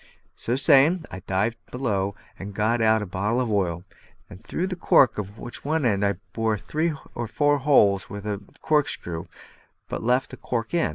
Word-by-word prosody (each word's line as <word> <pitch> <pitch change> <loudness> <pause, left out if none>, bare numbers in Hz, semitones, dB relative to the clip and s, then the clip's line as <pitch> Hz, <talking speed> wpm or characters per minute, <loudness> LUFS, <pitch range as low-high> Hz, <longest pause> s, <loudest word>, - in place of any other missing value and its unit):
So 120 - -2
saying, 150 +5 +5
I 95 - -6
dived 105 +5 -1
below 100 -6 -1 0.2
and 100 +1 -7
got 115 +3 +1
out 110 -1 +3
a - - -4
bottle 100 +6 -1
of 125 -3 -1
oil, 90 -4 0 0.6
through 165 +11 -2
the 185 -1 -3
cork 135 -9 +4
of 100 +1 -6
which 120 - -8
I 120 -10 +1 0.2
bored 110 -3 0
three 160 +2 -1 0.2
or 120 -1 -4
four 145 +5 +2
holes 105 -9 +4
with 100 0 -7
a 105 -1 -3 0.2
corkscrew, 145 - 0 0.6
but - - -4
left 125 +3 +1
the - - -8
cork 115 +1 -3
in. 170 - +2
115 Hz, 170 wpm, -25 LUFS, 100-140 Hz, 0.6 s, saying